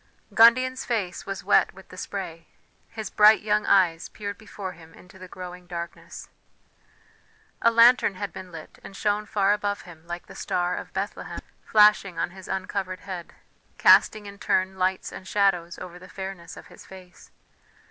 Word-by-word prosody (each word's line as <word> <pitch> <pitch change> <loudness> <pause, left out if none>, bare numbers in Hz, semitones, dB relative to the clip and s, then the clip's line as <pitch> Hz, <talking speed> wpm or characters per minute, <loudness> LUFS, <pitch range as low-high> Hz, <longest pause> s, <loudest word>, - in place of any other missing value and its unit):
Gundian's 255 +3 +5
face 205 -7 -3
was 195 -1 -5
wet - - +3
with 190 - -15
the - - -12
spray; 175 -3 -6 0.4
his 220 -2 -7
bright 215 0 +6
young 210 0 +1
eyes 175 -4 +3
peered 205 -1 -6
before 200 -3 -8
him 165 -1 -16
into 190 +1 -17
the 185 - -10
growing 180 0 -9
darkness. 170 -1 -8 1.3
A 230 - +5
lantern 230 -3 +5
had 200 -2 -5
been 185 -1 -9
lit 160 -2 -11
and 195 - -11
shone 210 +1 -1
far 200 -1 +2
above 205 -1 -2
him 170 -2 -15
like 175 0 -6
the - - -13
Star 175 0 -1
of - - -7
Bethlehem, - - -5 0.2
flashing 210 -4 +4
on 165 - -1
his 190 0 -12
uncovered 190 -1 -3
head, 185 -4 -8 0.4
casting 215 -1 +5
in 200 0 -10
turn 185 -1 0
lights 185 +1 0
and 185 - -10
shadows 185 -4 +1
over 180 -1 -9
the 185 +1 -14
fairness 190 -3 -8
of - - -11
his 180 0 -15
face. 185 -2 -15
190 Hz, 170 wpm, -25 LUFS, 180-205 Hz, 1.3 s, bright